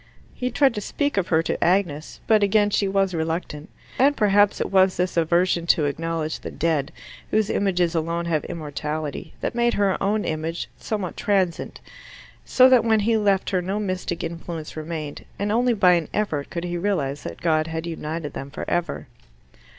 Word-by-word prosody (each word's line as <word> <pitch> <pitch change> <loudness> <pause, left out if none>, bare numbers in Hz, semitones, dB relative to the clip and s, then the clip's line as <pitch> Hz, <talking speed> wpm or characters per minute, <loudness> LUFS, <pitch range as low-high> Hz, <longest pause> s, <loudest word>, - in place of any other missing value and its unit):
He 250 - -2
tried 265 +1 +3
to 210 - -4
speak 285 +7 -1
of 195 -3 0
her 160 -1 +2
to - - -1
Agnes, 170 -4 0
but 220 -2 +4
again 205 +1 +3
she 200 - +1
was 195 -1 +1
reluctant. 160 -2 -3 0.3
And 280 +3 +4
perhaps 205 -1 +3
it - - -2
was 190 -1 +4
this 180 +1 -1
aversion 170 +1 +2
to 155 -2 +4
acknowledge 160 +1 -2
the - - -7
dead, 155 -4 -1 0.4
whose 215 -1 +1
images 180 -4 +1
alone 170 +1 -1
have 160 -3 0
immortality, 150 -1 -5
that - - -2
made 235 0 +1
her 200 -2 +1
own 210 +2 +1
image 160 +2 -3
somewhat 205 -5 -4
transient, 190 -4 -1 0.6
so 255 0 +6
that 255 -3 +5
when 220 -2 +3
he 225 +2 +2
left 200 -3 +1
her 185 -2 +1
no 190 +4 -2
mystic 185 -4 -3
influence 165 -1 -6
remained, 155 -2 -5
and 205 +1 -1
only 240 +2 +2
by 185 -3 +5
an 170 -3 +1
effort 155 -9 -1
could 170 - -4
he 175 0 -3
realize 150 -8 -1
that - - -7
God 155 -1 +1
had 160 0 -4
united 160 -2 -5
them 135 - -6
forever. 175 +4 -3
175 Hz, 180 wpm, -23 LUFS, 160-205 Hz, 0.6 s, so